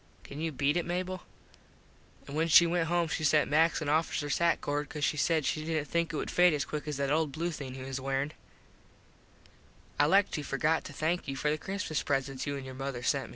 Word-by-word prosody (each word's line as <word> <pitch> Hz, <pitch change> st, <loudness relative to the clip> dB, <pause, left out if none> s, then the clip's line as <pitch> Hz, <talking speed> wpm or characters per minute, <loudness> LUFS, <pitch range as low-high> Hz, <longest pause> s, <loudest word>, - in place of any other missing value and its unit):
Can 145 Hz, +2 st, -8 dB
you 165 Hz, 0 st, -1 dB
beat 145 Hz, +2 st, +1 dB
it 175 Hz, -, -1 dB
Mable? 185 Hz, +1 st, -3 dB, 1.1 s
An 140 Hz, -, -8 dB
when 160 Hz, +2 st, +1 dB
she 170 Hz, +1 st, +8 dB
went 170 Hz, -1 st, 0 dB
home 170 Hz, 0 st, +1 dB
she 160 Hz, -, -3 dB
sent 150 Hz, -1 st, +3 dB
Max 165 Hz, +2 st, +3 dB
an -, -, -4 dB
officers 150 Hz, -1 st, 0 dB
hat 170 Hz, 0 st, +3 dB
cord 145 Hz, 0 st, -2 dB
cause 150 Hz, -2 st, -5 dB
she 150 Hz, -, +2 dB
said 155 Hz, 0 st, +1 dB
she 155 Hz, -, -1 dB
didnt 155 Hz, -2 st, -2 dB
think 170 Hz, 0 st, 0 dB
it -, -, -5 dB
would -, -, -3 dB
fade 175 Hz, -2 st, +5 dB
as 145 Hz, -, -1 dB
quick 150 Hz, 0 st, -5 dB
as 150 Hz, -2 st, -3 dB
that 140 Hz, 0 st, -1 dB
old 155 Hz, -1 st, +1 dB
blue 170 Hz, +4 st, -2 dB
thing 135 Hz, -5 st, -6 dB
he 130 Hz, -, -7 dB
was 135 Hz, 0 st, -4 dB
wearin. 135 Hz, +2 st, -1 dB, 1.7 s
I 145 Hz, -, +5 dB
like 195 Hz, +5 st, +4 dB
to 150 Hz, -, -2 dB
forgot 150 Hz, +3 st, 0 dB
to 145 Hz, -, -8 dB
thank 160 Hz, +4 st, -1 dB
you 135 Hz, -, -3 dB
for 150 Hz, +2 st, 0 dB
the 155 Hz, -, 0 dB
Christmas 190 Hz, -5 st, -3 dB
presents 135 Hz, -1 st, -2 dB
you 145 Hz, 0 st, -2 dB
an 135 Hz, -, -7 dB
your 130 Hz, -, -7 dB
mother 135 Hz, -2 st, -5 dB
sent. 135 Hz, -3 st, 0 dB
150 Hz, 235 wpm, -30 LUFS, 140-165 Hz, 1.7 s, she